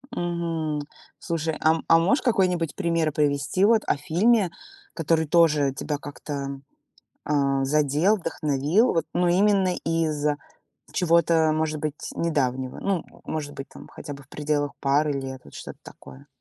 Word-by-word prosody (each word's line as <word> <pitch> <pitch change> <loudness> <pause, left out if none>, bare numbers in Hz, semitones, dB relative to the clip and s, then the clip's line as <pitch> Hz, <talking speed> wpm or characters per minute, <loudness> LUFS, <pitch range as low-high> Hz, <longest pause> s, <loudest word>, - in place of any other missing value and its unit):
Мгм. 165 -3 -2 0.4
Слушай, 160 -2 -2
ам, 160 +1 +2
а 165 - +6
можешь 190 - +2
какой-нибудь 180 - +1
пример 165 -2 0
привести 150 +6 +1
вот 220 0 +4
о - - +2
фильме, 185 +6 +2 0.4
который 160 -1 +1
тоже 150 -5 +3
тебя 145 +2 -3
как-то 140 -1 -6 0.7
а, 140 -2 +1
задел, 150 +7 +2
вдохновил, 155 - +1
вот 165 - 0
но 180 0 +2
именно 190 0 +3
из 160 -3 0 0.7
чего-то, 165 -2 +3
может 155 -1 -1
быть, 150 0 -4
недавнего, 130 -6 -1
ну, 195 -4 -1 0.2
может 150 -2 -4
быть, 135 - -7
там - - -12
хотя 145 -1 -8
бы 140 0 -11
в 135 - -27
пределах 145 -1 -1
пары 145 +2 +2
лет, 135 -1 -5
вот - - -16
что-то - - -9
такое. 140 +2 -14
155 Hz, 145 wpm, -25 LUFS, 145-170 Hz, 0.7 s, а